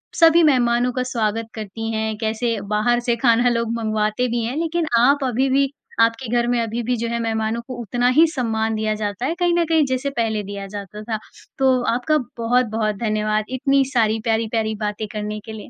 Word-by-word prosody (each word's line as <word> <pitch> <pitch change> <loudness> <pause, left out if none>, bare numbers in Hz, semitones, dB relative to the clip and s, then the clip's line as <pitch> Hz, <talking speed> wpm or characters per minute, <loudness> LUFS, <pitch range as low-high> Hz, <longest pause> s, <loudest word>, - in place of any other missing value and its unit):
सभी 330 0 +6
मेहमानों 245 -4 +3
का 255 - -1
स्वागत 225 -3 -2
करती 220 +1 -5
हैं, 220 0 -1
कैसे 225 0 -1
बाहर 215 +4 +2
से 240 - +3
खाना 240 +1 +4
लोग 230 -1 -1
मँगवाते 215 +1 0
भी 235 -1 -1
हैं 235 +4 -3
लेकिन 330 0 -1
आप 275 +3 +4
अभी 260 +1 +1
भी 275 +1 +3 0.3
आपके 230 +2 +1
घर 240 0 +1
में 245 -1 +1
अभी 230 +1 -3
भी 245 +2 0
जो 235 - -2
है 235 - -1
मेहमानों 225 0 -1
को 255 - -6
उतना 245 +3 0
ही 330 - +8
सम्मान 225 -3 -1
दिया 215 0 0
जाता 205 +3 -2
है 325 - 0
कहीं 350 -1 +2
न 335 - +2
कहीं 320 -3 +4
जैसे 260 +1 -1
पहले 220 -2 0
दिया 200 0 -6
जाता 205 +1 -8
था। 220 0 -2 0.4
तो 265 -1 +3
आपका 255 +6 +1 0.2
बहुत-बहुत 230 -2 +1
धन्यवाद 215 -1 0
इतनी 270 +1 +2
सारी 225 -2 +2
प्यारी-प्यारी 220 -1 0
बातें 210 +1 -3
करने 210 0 -4
के 220 - -8
लिए। 215 -1 -9
230 Hz, 200 wpm, -21 LUFS, 220-250 Hz, 0.4 s, ही